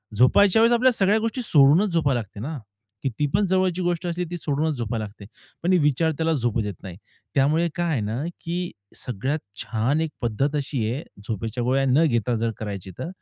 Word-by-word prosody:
झोपायच्या 190 - +5
वेळेस 230 +1 +5
आपल्या 250 +2 +4
सगळ्या 205 0 +3
गोष्टी 230 +3 -2
सोडूनच 160 +2 +5
झोपायला 140 -7 +2
लागते 105 -2 -9
ना, 145 +6 -4 0.5
कीतीपण 145 - 0
जवळची 185 -1 +1
गोष्ट 175 0 -1
असली 175 +1 -2
ती 175 - -3
सोडूनच 155 0 -1
झोपायला 115 -1 -2
लागते. 105 0 -12 0.4
पण 180 - +3
विचार 150 +3 +2
त्याला 165 0 +1
झोपू 120 -5 0
देत 105 -1 -3
नाही. 90 -2 -8 0.4
त्यामुळे 155 +5 +3
काय 175 -1 0
आहे 135 -8 0
ना, 110 +6 -2 0.2
की 175 +1 -3 0.2
सगळ्यात 130 +6 -2 0.2
छान 125 +7 0
एक 160 -2 -2
पद्धत 130 +6 0
अशी 140 -2 -2
आहे 140 +6 -4 0.2
झोपेच्या 115 +2 -3
गोळ्या 135 +2 +2
न 145 +6 +4
घेता 120 -2 0
जर 115 +1 0
करायची, 100 -3 -6
तर - - -3
145 Hz, 185 wpm, -24 LUFS, 115-170 Hz, 0.5 s, झोपायच्या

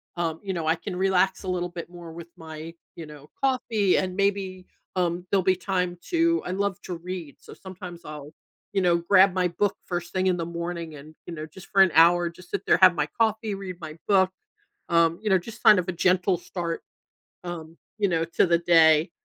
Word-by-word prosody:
um, 165 -2 -2
you 195 -1 -3
know, 165 -2 -3
I 160 - +3
can 180 +3 -6
relax 190 +1 +1
a - - -7
little 180 -1 -1
bit 170 0 -8
more 175 -2 -10
with 165 0 -9
my, 160 0 -8 0.2
you 165 -2 -8
know, 150 -1 -13
coffee, 230 -7 +2
and 185 -1 -1
maybe, 195 -2 -1 0.3
um, 175 -1 -1
there'll 195 - +3
be 185 0 +3
time 180 -1 -2
to 335 0 +2
I 180 - -3
love 200 0 -1
to 180 - -5
read, 170 -4 -7
so - - -13
sometimes 180 -2 -10
I'll, 150 -1 -9 0.4
you 195 - +1
know, 175 -2 +3
grab 190 +2 +4
my 180 -1 +1
book 195 +4 0
first 175 -1 -4
thing 185 0 0
in 185 - +3
the 165 - -3
morning 170 -1 -5
and, 150 +2 -12
you 175 - -6
know, 155 -1 -6
just 175 +4 -14
for 195 - +3
an 185 - +2
hour, 170 +2 +5
just 180 +1 -16
sit - - -3
there, - - +4
have 185 -2 +7
my 150 -2 0
coffee, 220 -1 +1
read 185 -2 -7
my 155 -2 -8
book, 190 -2 +4 0.6
um, 170 0 +3
you 215 - -1
know, 190 - +6
just 220 +6 -10
kind 210 - +7
of 180 - -8
a - - 0
gentle 180 +1 +2
start, 170 -1 -5 0.6
um, 165 -2 -7 0.2
you 205 -1 +2
know, 165 -2 0
to 170 +3 +2
the 170 -1 +3
day, 165 -2 +5
175 Hz, 220 wpm, -25 LUFS, 170-190 Hz, 0.6 s, have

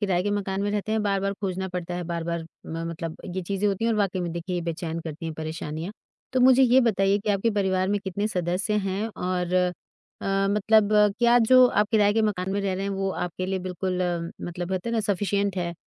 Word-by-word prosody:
किराए 190 -4 +1
के 205 - -1
मकान 200 -1 -1
में 205 - 0
रहते 210 +1 -2
हैं, 220 - +1
बार-बार 195 -1 0
खोजना 190 -1 -2
पड़ता 175 0 -3
है 175 - -3
बार-बार 170 0 -3 0.2
म 165 - -5
मतलब 165 -1 -5 0.2
ये 185 - -2
चीज़ें 200 +3 -1
होती 200 +3 -1
हैं 230 - +2
और - - 0
वाक़ई 190 -2 0
में 175 - -2
देखिए 175 +1 -3
बेचैन 165 0 -4
करती 160 0 -7
हैं 160 - -4
परेशानियाँ, 160 +3 -5 0.4
तो 255 - +2
मुझे 260 +1 +6
ये 255 +1 +6
बताइए 200 -4 +2
कि 210 +1 -2
आपके 205 +3 +1
परिवार 190 -3 +1
में 205 +1 +1
कितने 200 +3 -1
सदस्य 180 +3 -1
हैं 195 +3 -1
और 180 -1 -2
अ, 180 -1 +3 0.8
मतलब 210 +1 +3 0.3
क्या 240 0 +5
जो 255 +2 +7
आप 210 -3 +1
किराए 205 -2 +4
के 225 - +2
मकान 190 -3 -1
में 200 - 0
रह 195 -1 -1
रहे 190 - -3
हैं 200 - -2
वो 195 0 -1
आपके 180 0 -3
लिए 190 0 -1
बिल्कुल 185 0 -3
अम, 170 -1 -2 0.2
मतलब 175 +1 -4
होते 185 +4 -2
हैं 235 - -1
ना 225 - +2
सफ़िशिएंट 200 -1 0
है, 175 -1 -2
190 Hz, 225 wpm, -25 LUFS, 175-205 Hz, 0.8 s, जो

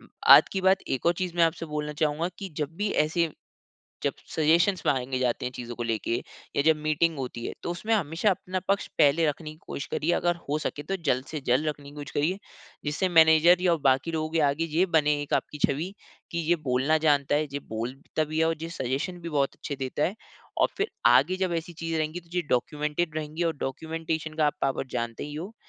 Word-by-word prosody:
उम, - - -19 0.2
आज - - +10
की 190 - -1
बात 190 +1 +4
एक 130 - -2
और 170 - +6
चीज़ 180 0 -3
मैं 170 - +4
आपसे 165 0 -1
बोलना 150 -1 -3
चाहूँगा 155 +2 0
कि 195 -2 -5
जब 150 -2 -1
भी 205 +2 0
ऐसे 165 +2 +1 0.7
जब - - +1 0.2
सजेशंस 170 +4 +3
माँगे 130 -1 0
जाते 125 -1 0
हैं 125 - -2
चीज़ों 120 -1 -6
को 120 - -3
लेके 115 0 -1 0.4
या - - +3
जब 160 0 +6
मीटिंग 155 +1 +1
होती 125 -3 -5
है - - -4
तो - - -2
उसमें 215 +6 -1
हमेशा 170 0 +1
अपना 185 0 -3
पक्ष 200 0 +1
पहले 150 +3 +4
रखने 155 +1 -3
की 155 - -14
कोशिश 140 - -4
करिए 165 +3 0
अगर 175 0 +1
हो 150 - +1
सके 145 - -3
तो - - +2
जल्द 130 0 +2
से 155 - -3
जल्द 130 +6 +2
रखने 145 -2 -4
की 145 - -15
कोशिश 145 -2 -7
करिए। 165 +7 0 0.5
जिससे 150 +6 0
मैनेजर 165 +1 +6
या 175 -2 +3
बाकी 130 +5 +1
लोगों 155 -1 -2
के 165 - +2
आगे 145 +4 -1
ये 180 +3 +4
बने 150 -1 +4
एक 145 - -5
आपकी 150 - -1
छवि 165 +8 -3 0.4
कि 170 - -3
ये 175 - +5
बोलना 130 +5 +3
जानता 145 -1 +3
है 150 - +2
ये 140 - -2
बोलता 125 +8 -3
भी 155 +1 -3
है 160 - +4
और 165 0 +1
ये 165 - -4
सजेशन 140 +4 -3
भी 170 - -5
बहुत 140 -3 0
अच्छे 145 - -5
देता 135 +2 -2
है 190 - 0 0.4
और - - +4
फ़िर 405 +2 +1 0.2
आगे 135 +10 +5
जब 180 -2 0
ऐसी 165 +1 -6
चीज़ें 165 0 -3
रहेंगी 155 +2 -2
तो 170 -1 -23
ये - - +3
डॉक्यूमेंटेड 150 +5 -1
रहेंगी 155 +2 -3
और 165 -1 +1
डॉक्यूमेंटेशन 160 +3 -3
का 155 - +2
आप 145 - 0
पावर 135 0 0
जानते 115 -1 -3
ही 145 - -7
हो, 185 +8 -6
155 Hz, 225 wpm, -27 LUFS, 140-170 Hz, 0.7 s, आज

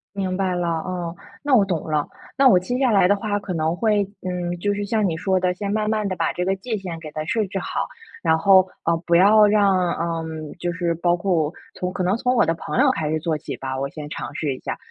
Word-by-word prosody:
明 185 -2 -1
白 190 -1 0
了。 175 -1 -1
哦， 170 +1 -3 0.3
那 285 -3 +3
我 205 - +6
懂 175 -5 -2
了， 150 -1 0 0.3
那 270 -1 +6
我 185 -7 +6
接 245 +7 -3
下 260 -3 +2
来 195 -3 +5
的 205 - +4
话， 205 0 -2
可 200 -2 -5
能 160 +1 0
会 210 -1 +2 0.2
嗯， 180 -1 -3
就 205 +2 0
是 205 0 -3
像 215 -1 +1
你 165 - -1
说 185 +2 +1
的， 180 0 +1
先 200 +2 -4
慢 215 0 0
慢 215 -2 0
地 185 - -2
把 165 - 0
这 180 - -2
个 195 +1 +1
界 220 +2 -3
限 175 -4 -6
给 155 -2 -8
它 155 - -4
设 220 +4 0
置 195 +1 -5
好， - - -3 0.3
然 160 -2 +3
后， 190 +2 +5 0.2
呃， 170 0 +2
不 170 - +3
要 210 +3 +7
让 195 -4 +3
呃， 165 -1 -2 0.4
就 175 0 -1
是 170 0 -1
包 175 +1 +2
括 175 -4 0 0.2
从 180 0 -3
可 185 - -2
能 185 +4 +2
从 250 +1 +1
我 235 - +4
的 165 - +1
朋 235 - -3
友 270 -1 +5
开 155 -9 -2
始 155 0 0
做 155 -1 -1
起 - - -6
吧， 130 0 -4
我 140 - -1
先 150 -1 -8
尝 120 -5 -6
试 145 -4 -1
一 - - -11
下， - - -4
185 Hz, 280 characters per minute, -22 LUFS, 165-205 Hz, 0.4 s, 要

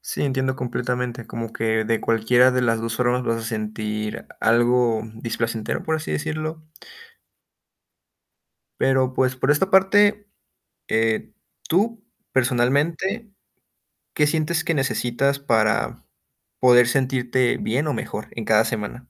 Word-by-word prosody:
Sí, - - -4
entiendo 130 -1 0
completamente, 125 -2 -3
como 115 -1 -6
que 110 0 0
de 115 0 0
cualquiera 120 +3 +3
de 125 0 +1
las 115 -1 +1
2 115 0 -3
formas 125 0 +1
vas 115 0 0
a 115 - -6
sentir 110 -1 -4 0.2
algo 120 -1 +3
displacentero, 115 -1 -3
por 160 0 -1
así 155 - -5
decirlo. 155 0 -3 2.2
Pero, 130 -1 +2
pues, 130 0 +1
por 130 - 0
esta 185 +6 +2
parte, 205 +2 +4 0.6
eh, 110 0 0 0.4
tú, 210 +5 +1 0.3
personalmente, 145 - 0 0.8
¿qué 150 - +2
sientes 160 +2 0
que 165 - 0
necesitas 135 0 0
para 110 -5 0 0.6
poder 125 -1 +6
sentirte 130 -1 +1
bien 135 +7 -1
o 150 - 0
mejor 105 - -5
en 115 - -6
cada 110 0 +4
semana? 105 -3 -3
125 Hz, 125 wpm, -22 LUFS, 115-150 Hz, 2.2 s, poder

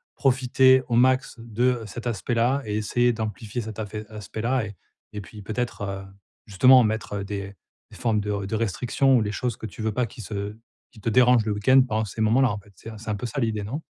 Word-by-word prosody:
profiter 130 -1 +4
au 120 - 0
max 130 0 +2
de 120 +2 0
cet 120 +4 -8
aspect-là 120 +4 0
et 105 0 -3
essayer 120 +3 +1
d'amplifier 110 +1 -4
cet 110 0 -7
afé 105 0 -5
aspect-là 110 +3 -2
et 105 -1 -9 0.4
et 105 -1 -6
puis, 105 +2 -11
peut-être, 110 +3 -4
heu, 95 -1 -4 0.4
justement, 125 +5 +6
mettre 105 -2 -2
des 100 0 -6 0.4
formes 110 -3 0
de 100 -1 -2
de 110 - -3
restrictions 125 +5 +2
ou 110 - +2
des 105 - -2
choses 120 +3 -3
que - - -7
tu 110 - -8
veux 110 0 0
pas 125 +3 0
qui 115 - -10
se 100 +1 -5 0.4
qui 110 -4 -16
te 115 - -1
dérangent 125 -1 +5
le 105 - 0
week-end 130 +6 +5
pendant 110 0 0
ces 110 +3 -6
moments-là, 120 +2 +3
en 100 - -4
fait, 100 0 -20
c'est 115 - -10
c'est 110 0 -8
un 105 - 0
peu 105 - -5
ça, 135 +4 -4
l'idée, 110 -3 -1
non? 135 +10 -4
110 Hz, 215 wpm, -25 LUFS, 105-125 Hz, 0.4 s, justement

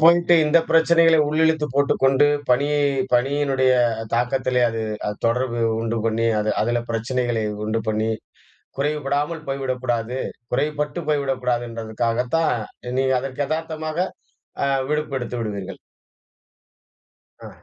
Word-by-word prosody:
போயிட்டு 170 +1 +6
இந்த 155 +3 +5
பிரச்சனைகளை 165 0 +5
உள்ளிழுத்துப் 160 -2 +1
போட்டுக் 140 -1 +1
கொண்டு, 135 +2 +5 0.2
பணியை 145 +4 +2 0.3
பணியினுடைய 135 +1 +2 0.4
தாக்கத்திலே 125 +1 +1
அது 115 0 -4 0.3
அது 105 - -4
தொடர்பு 120 0 0 0.2
உண்டு 115 0 -2
பண்ணி, 115 +1 +1
அது 105 0 0
அதுல 120 +1 0
பிரச்சனைகளை 115 0 -1 0.2
உண்டு 110 +1 -1
பண்ணி 110 +1 0 0.7
குறைவுபடாமல் 150 +2 -1
போய்விடக்கூடாது 130 -3 -2 0.3
குறைவுபட்டு 150 +3 -1
போய்விடக்கூடாதுன்றதுக்காகத்தான், 120 0 -1 0.4
நீங்க 130 0 +2
அதற்கு 135 +1 -3
எதார்த்தமாக 155 0 -3 0.6
ஆ - - +2 0.2
விடுப்பு 150 -2 -1
எடுத்து 125 0 -5
விடுவீர்கள். 100 -4 -5 1.7
ஆ. - - -8
130 Hz, 105 wpm, -22 LUFS, 120-150 Hz, 1.7 s, போயிட்டு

